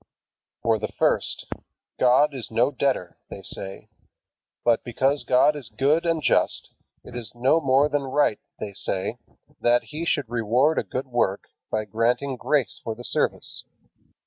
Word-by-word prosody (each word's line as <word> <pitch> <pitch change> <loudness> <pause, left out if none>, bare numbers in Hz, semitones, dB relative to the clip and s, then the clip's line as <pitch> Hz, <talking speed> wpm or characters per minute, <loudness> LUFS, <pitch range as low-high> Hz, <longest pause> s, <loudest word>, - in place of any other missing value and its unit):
For 115 -1 +2
the 105 - -2
first, - - +1 0.5
God 130 +4 +4
is 130 -4 -2
no 115 +5 +2
debtor, 130 -9 -1
they - - -8
say; 95 0 -5 0.8
but 120 -1 +3
because 135 +4 0
God 130 +4 +4
is 135 -8 -7
good 145 +9 +1
and 165 -2 0
just, - - +1 0.3
it - - -11
is 120 -2 -7
no 130 +7 +3
more 135 +1 +4
than 145 -1 0
right 135 -5 +2 0.2
(they 100 -1 -5
say) 95 -1 -2 0.4
that 120 0 +3
He 155 +2 -6
should 145 -7 +1
reward 120 +6 +2
a - - -1
good 130 - -4
work 120 -6 0 0.3
by 110 0 -1
granting 120 +6 0
grace 140 +1 0
for 115 -2 -3
the 120 - -10
service. - - -1
125 Hz, 155 wpm, -25 LUFS, 115-140 Hz, 0.8 s, God